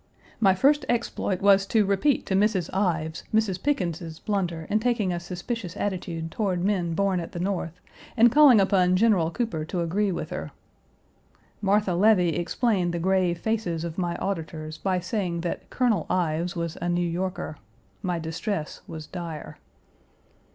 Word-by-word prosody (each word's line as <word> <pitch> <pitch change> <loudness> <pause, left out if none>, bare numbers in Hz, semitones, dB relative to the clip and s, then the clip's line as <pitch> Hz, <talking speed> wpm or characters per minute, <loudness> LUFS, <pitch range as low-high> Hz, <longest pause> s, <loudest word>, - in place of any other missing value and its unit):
My 195 -4 +4
first 290 +8 +3
exploit 230 -5 -1
was 195 -1 +5
to 215 -1 +3
repeat 200 +8 +1
to - - -2
Mrs. 195 -3 +2
Ives 170 -5 -1
Mrs. 215 -4 +1
Pickens's 170 - -2
blunder 175 -5 -2
in 215 - +1
taking 220 -5 0
a 175 - -2
suspicious 180 +2 -5
attitude 175 -5 -3
toward 185 -4 -1
men 180 -4 0
born 195 0 +1
at 165 - -7
the 175 - -4
North, 180 -2 -3 0.4
and 235 +1 +6
calling 285 -5 +7
upon 185 -2 +3
General 190 -5 +3
Cooper 175 -5 -2
to 175 +2 -2
agree 195 +4 0
with - - -4
her. - - -4 1.1
Martha 200 -1 +2
Levy 185 -1 +4
explained 175 - 0
the - - -1
grave 185 -1 +2
faces 175 -5 -2
of 170 +1 -5
my 175 -1 -1
auditors 160 -4 -4
by 185 0 0
saying 180 -2 -2
that 170 - -4
Colonel 230 -9 +1
Ives 170 -1 0
was 170 -1 -4
a 175 - -1
New 175 0 +1
Yorker. 180 -2 -3 0.4
My 180 -2 -1
distress 165 +1 -4
was 155 -2 -7
dire. 170 -4 -7
185 Hz, 160 wpm, -26 LUFS, 170-205 Hz, 1.1 s, calling